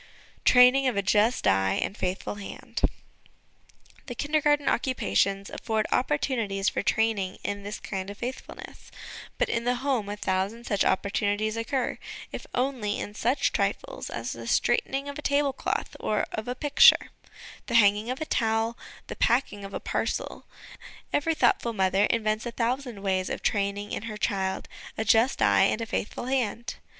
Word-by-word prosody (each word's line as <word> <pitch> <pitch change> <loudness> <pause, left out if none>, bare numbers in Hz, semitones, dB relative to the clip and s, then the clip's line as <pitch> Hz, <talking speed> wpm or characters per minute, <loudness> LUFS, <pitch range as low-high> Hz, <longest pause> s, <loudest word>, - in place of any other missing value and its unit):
Training 250 +2 +6
of 250 - 0
a 200 - +1
Just 210 +5 +2
Eye 95 0 +3
and 200 - -2
Faithful 185 -1 -3
Hand. 205 -1 -7 1.3
The 245 - -5
Kindergarten 295 +1 +1
'Occupations' 200 - +1
afford 220 -2 -1
opportunities 230 -8 0
for - - -2
training 215 -4 0
in 205 0 -3
this 205 +1 -6
kind 190 -1 -5
of 205 - -8
faithfulness; 250 +3 -8 0.5
but - - +1
in 235 - -1
the 245 +1 +1
home 250 -5 -1
a 205 - -4
thousand 200 +4 -2
such 205 -2 +1
opportunities 205 +2 0
occur; 240 +3 -2 0.3
if - - -7
only 245 -5 -1
in 205 - -5
such 240 +6 +1
trifles - - -2
as - - -4
the - - -7
straightening 275 +1 +1
of 285 +1 -6
a - - -5
tablecloth 285 -2 0
or 210 - 0
of 215 - -5
a 250 - -2
picture, 290 +2 +5 0.6
the 235 - -1
hanging 210 0 +4
of 255 - -3
a 315 - -2
towel, 225 -3 0 0.3
the - - -7
packing 235 -4 +1
of 195 - -7
a - - -2
parcel - - -3 0.7
every 320 +3 +1
thoughtful 235 -3 +2
mother 195 0 +2
invents 215 0 0
a - - -3
thousand 240 -2 -2
ways 185 -1 0
of - - -4
training 205 0 -1
in - - -3
her 215 -1 -6
child 190 -3 -1 0.3
a 220 - -1
just 225 +5 +3
eye - - +5
and - - +1
a 230 - -2
faithful 225 +1 -3
hand. 240 -3 -2
225 Hz, 160 wpm, -27 LUFS, 200-255 Hz, 1.3 s, Training